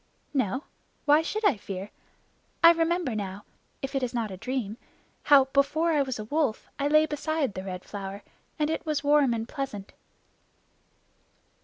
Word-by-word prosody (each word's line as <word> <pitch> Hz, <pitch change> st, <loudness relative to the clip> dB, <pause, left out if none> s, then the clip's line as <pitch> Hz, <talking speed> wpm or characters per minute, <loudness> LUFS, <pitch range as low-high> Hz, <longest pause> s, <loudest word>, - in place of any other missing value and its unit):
"No. 260 Hz, 0 st, 0 dB, 0.4 s
Why 295 Hz, +2 st, +6 dB
should 430 Hz, +6 st, -2 dB
I 295 Hz, -, +4 dB
fear? 195 Hz, 0 st, -6 dB, 0.7 s
I 335 Hz, -, +11 dB
remember 335 Hz, -4 st, +1 dB
now 200 Hz, -1 st, -5 dB, 0.4 s
if 270 Hz, +1 st, -3 dB
it 270 Hz, -, 0 dB
is 250 Hz, -1 st, -2 dB
not 225 Hz, -3 st, -1 dB
a -, -, -5 dB
dream 235 Hz, -1 st, -3 dB, 0.5 s
how, 280 Hz, -2 st, +7 dB
before 310 Hz, +4 st, +3 dB
I 300 Hz, -3 st, +3 dB
was 260 Hz, -3 st, -2 dB
a 215 Hz, -, -5 dB
Wolf, 285 Hz, -2 st, -1 dB
I 280 Hz, -, +1 dB
lay 305 Hz, +1 st, +5 dB
beside 300 Hz, -4 st, -1 dB
the 185 Hz, -, -5 dB
Red 185 Hz, -1 st, -6 dB
Flower, 200 Hz, 0 st, -7 dB, 0.3 s
and 305 Hz, -1 st, +1 dB
it 320 Hz, -, -2 dB
was 305 Hz, -3 st, -1 dB
warm 290 Hz, -3 st, +4 dB
and 225 Hz, -1 st, -2 dB
pleasant." 250 Hz, -9 st, -5 dB
270 Hz, 165 wpm, -27 LUFS, 215-305 Hz, 0.7 s, I